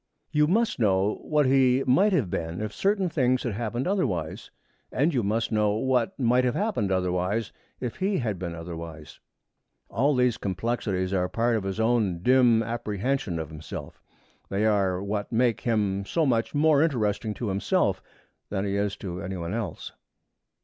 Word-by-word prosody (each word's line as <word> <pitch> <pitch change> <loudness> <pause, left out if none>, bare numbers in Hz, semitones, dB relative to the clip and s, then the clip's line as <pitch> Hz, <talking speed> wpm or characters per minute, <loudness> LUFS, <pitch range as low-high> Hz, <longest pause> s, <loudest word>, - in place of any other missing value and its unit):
You 150 0 +3
must 220 - +1
know 100 -2 +2
what 150 -2 +1
he 130 0 +4
might 190 +12 +4
have 130 - +1
been 80 +1 -3
if 105 -1 -4
certain 195 - +1
things 130 -6 +1
had 120 - -2
happened 120 +3 -2
otherwise, 100 - -1 0.4
and 150 +6 +1
you 125 - +2
must 110 +3 -1
know 105 -1 +2
what 125 +2 0
might 125 0 +3
have 125 -1 +1
happened 195 - 0
otherwise 95 +4 0 0.3
if 125 -3 -4
he 195 +1 0
had 110 -7 -2
been 85 -2 -4
otherwise. 80 -2 -8 0.7
All 140 +7 +2
these 125 -2 +2
complexities 95 -1 -2
are 90 -1 +2
a - - -5
part 115 0 +1
of 105 -3 -2
his 95 +2 -3
own 110 -7 +1
dim 125 -2 +5
apprehension 115 -2 -2
of 80 -2 -4
himself. 75 -2 -8 0.5
They 100 +2 0
are 100 -3 +1
what 100 0 -3
make 120 0 +2
him 105 -4 0
so 165 -2 +1
much 115 0 0
more 150 -1 +4
interesting 110 -8 0
to 115 - -3
himself 95 +1 +1 0.5
than 100 -1 -2
he 100 0 -1
is 100 -1 0
to 90 -1 -6
any 95 -1 -4
one 85 +1 -4
else. 110 -3 -4
110 Hz, 170 wpm, -26 LUFS, 95-125 Hz, 0.7 s, dim